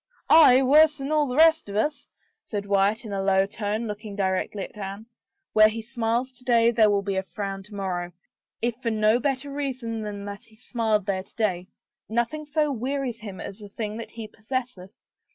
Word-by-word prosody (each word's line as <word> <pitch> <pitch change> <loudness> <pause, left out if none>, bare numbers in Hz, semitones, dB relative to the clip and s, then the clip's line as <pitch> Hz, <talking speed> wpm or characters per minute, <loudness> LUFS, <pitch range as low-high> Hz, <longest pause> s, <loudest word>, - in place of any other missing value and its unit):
" - - -43 0.2
Aye, 255 +1 +6
worse 300 +3 +6
than 275 +1 -4
all 305 -1 +3
the 250 - -3
rest 320 -4 +5
of 200 - -6
us," 290 +8 -1 0.3
said 205 -2 -4
Wyatt 200 +3 +1
in 210 - -6
a 195 - -1
low 195 0 +3
tone, 210 +2 -3
looking 210 -1 -6
directly 190 0 -1
at - - -10
Anne. 200 +1 -6 0.2
" 395 -1 -56
Where 215 0 +7
he 220 +1 -4
smiles 235 +2 -1
to 250 0 -21
day, 235 -2 +4
there 220 -2 +4
will 200 -1 +1
be 195 -1 -1
frown 195 +2 -5
to 205 +2 -12
morrow 180 -3 -3 0.3
— - - -64
if 235 0 +1
for 235 - 0
no 215 +1 +3
better 275 +1 -2
reason 255 -6 -3
than 205 -1 -6
that 200 0 -8
he 220 - -21
smiled 220 -3 -1
there 195 -2 -1
to - - -20
day!... 185 -5 -1 0.4
Nothing 240 +7 -1
so 300 0 +1
wearies 260 -1 -3
him 205 -4 -8
as 200 - -7
the 205 -1 -10
thing 210 +1 -5
that 230 - -7
he 225 -1 -8
possesseth. 220 -3 -5
220 Hz, 210 wpm, -25 LUFS, 200-255 Hz, 0.4 s, Where